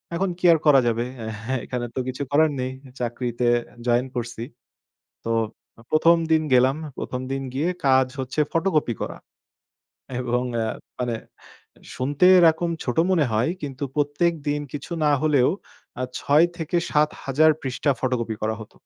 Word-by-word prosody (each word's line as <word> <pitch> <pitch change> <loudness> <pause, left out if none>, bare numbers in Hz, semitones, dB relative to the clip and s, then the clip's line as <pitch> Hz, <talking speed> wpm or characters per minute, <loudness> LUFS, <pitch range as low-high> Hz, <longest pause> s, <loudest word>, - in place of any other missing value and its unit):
এখন 190 +2 0
কি 180 - -2
আর - - +3
করা 140 -3 +7
যাবে? 120 +1 0 0.4
হ্যাঁ, 130 0 -1
এখানে 125 -1 -3
তো - - -1
কিছু 130 +2 -4
করার 155 +1 +4
নেই। 130 0 -2 0.3
চাকরিতে 120 0 -2 0.4
জয়েন 120 +2 +3
করছি। 120 -1 -4 0.8
তো 115 - -3 0.6
১ম 165 +2 +5 0.2
দিন 160 0 +4
গেলাম। 130 +3 +4 0.2
১ম 125 - -4
দিন 135 0 -2
গিয়ে 155 +6 0 0.2
কাজ 130 -1 +5
হচ্ছে 130 +4 -3
ফটোকপি 160 -8 +1
করা। - - -5 1.0
এবং 125 0 0 0.2
আ - - -1 0.3
মানে, 120 -2 -1 0.8
শুনতে 140 +6 +1
এরকম 170 0 +4
ছোট 125 +2 -3
মনে 160 -6 +3
হয় 110 +8 +1
কিন্তু 140 -1 -5
প্রত্যেকদিন 150 0 0
কিছু 145 +4 -7
না 150 - +4
হলেও 145 -4 +3 0.5
আ - - 0 0.2
৬-৭,০০০ 155 -2 +2
পৃষ্ঠা 135 +2 0
ফটোকপি 120 -4 -1
করা 110 0 0
হত। 105 - -12
135 Hz, 140 wpm, -24 LUFS, 125-155 Hz, 1.0 s, করা